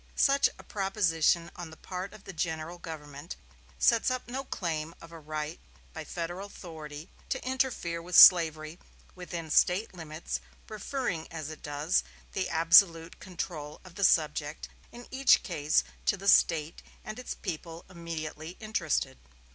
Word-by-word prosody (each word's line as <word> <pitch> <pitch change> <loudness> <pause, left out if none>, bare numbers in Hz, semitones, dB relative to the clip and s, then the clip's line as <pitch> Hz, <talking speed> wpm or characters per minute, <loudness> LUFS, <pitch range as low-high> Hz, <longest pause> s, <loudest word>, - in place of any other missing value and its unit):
Such 275 0 +4
a - - -13
proposition 175 -4 +1
on 175 -2 -7
the 160 - -13
part 185 +1 -6
of 210 -1 -14
the 195 - -9
general 160 +1 -3
government 150 -2 -8 0.4
sets 225 - +3
up 255 -1 -3
no 260 +3 -4
claim 165 - -3
of 165 - -13
a 165 - -10
right 155 0 -5 0.3
by - - -7
Federal 175 +4 -5
authority 155 -5 -9 0.2
to - - -3
interfere 255 - -1
with 175 +1 -5
slavery 160 -3 +7 0.3
within 170 -3 -7
State 185 +8 +3
limits, 160 -2 -5 0.3
referring, 215 - -3
as 160 -2 -5
it 155 - -10
does, 150 +4 0 0.3
the 190 -1 -1
absolute 165 0 +5
control 160 -5 -6
of 180 - -13
the 200 +2 -4
subject 150 -3 +1 0.2
in 240 0 -11
each 270 0 +4
case 155 -4 +1 0.2
to 205 - +3
the 195 +1 -7
State 165 -4 +4 0.2
and 215 - -6
its 250 - -5
people 165 -2 -6
immediately 165 -2 -7
interested. 185 - -1
170 Hz, 145 wpm, -29 LUFS, 155-190 Hz, 0.4 s, slavery